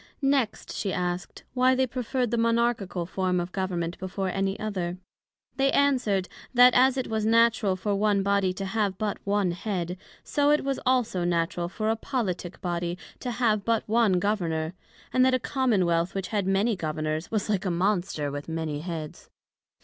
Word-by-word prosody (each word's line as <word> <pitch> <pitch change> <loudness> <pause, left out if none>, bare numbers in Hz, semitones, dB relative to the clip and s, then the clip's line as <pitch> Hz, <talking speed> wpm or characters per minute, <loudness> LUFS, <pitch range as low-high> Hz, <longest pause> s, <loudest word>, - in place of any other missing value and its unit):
Next, 270 -5 0
she 200 - -2
asked, 180 0 -3
Why 255 0 +4
they 260 0 +2
preferred 250 -1 -2
the 235 - +1
Monarchical 230 -6 +1
form 185 0 0
of 175 +1 -4
Government 180 -3 -2
before 190 +1 -3
any 195 +1 -1
other? 185 -5 -3 0.6
They 275 0 +3
answered, 245 -9 +2 0.3
That 250 0 +8
as 260 +1 +4
it 260 - -1
was 220 -1 -1
natural 225 -3 +3
for 205 +2 -2
one 200 -1 +2
Body 200 -1 +2
to 195 +1 -5
have 200 -1 -1
but 210 -1 -2
one 200 -2 +1
Head, 180 -1 -3 0.3
so 290 0 +1
it 300 0 +3
was 275 0 -1
also 245 -8 +2
natural 170 0 0
for 215 +3 -1
a - - +1
Politick 195 -8 -3
body 175 0 -2 0.2
to 250 - -4
have 225 -4 +1
but 230 0 0
one 225 -2 +3
Governor; 175 -4 0 0.4
and 255 - +4
that 260 0 +4
a - - 0
Common 245 -8 +1
wealth, 170 +2 0
which 195 -1 -3
had 205 -3 -1
many 200 +4 +2
Governors 155 -1 -3
was 215 -3 -1
like 205 -2 0
a - - +1
Monster 175 -5 0
with 145 +2 -6
many 160 -2 -3
Heads. 160 -2 -6
200 Hz, 180 wpm, -27 LUFS, 175-230 Hz, 0.6 s, That